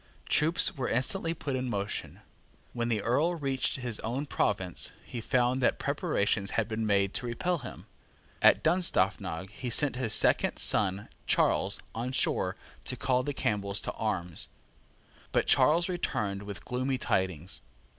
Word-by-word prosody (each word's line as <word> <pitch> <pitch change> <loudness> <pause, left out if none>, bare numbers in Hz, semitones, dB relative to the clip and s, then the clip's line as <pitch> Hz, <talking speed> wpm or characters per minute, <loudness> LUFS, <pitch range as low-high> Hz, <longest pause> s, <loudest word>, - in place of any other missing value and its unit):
Troops 160 +3 +4
were 130 -3 -2
instantly 165 +8 +1
put 140 -4 -3
in 130 -1 -2
motion. 100 -2 -4 0.5
When 120 0 -2
the 110 -3 0
Earl 150 +10 +2
reached 135 -4 -1
his 120 -4 -4
own 125 +6 -3
province, 95 - -1
he 120 - -6
found 125 +2 +1
that - - +2
preparations 135 - 0
had 110 -2 +1
been 110 -1 -2
made 100 -1 +2
to 125 - -3
repel 170 +9 -1
him. 125 - -9 0.6
At - - +6
Dunstaffnage 100 - +1
he 125 +4 -5
sent 135 +2 +2
his 115 -4 +2
second - - +3
son 95 +3 +2 0.2
Charles - - +2
on 120 +3 -4
Shore - - +1 0.3
to - - -2
call 125 -1 +1
the 145 - -3
Campbells 100 -6 -1
to - - -3
arms. 90 -6 -3 0.8
But - - +2
Charles 170 +4 +4
returned 105 - -2
with 100 -3 -8
gloomy 130 +2 -1
tidings. 95 -6 -1
120 Hz, 150 wpm, -29 LUFS, 100-135 Hz, 0.8 s, At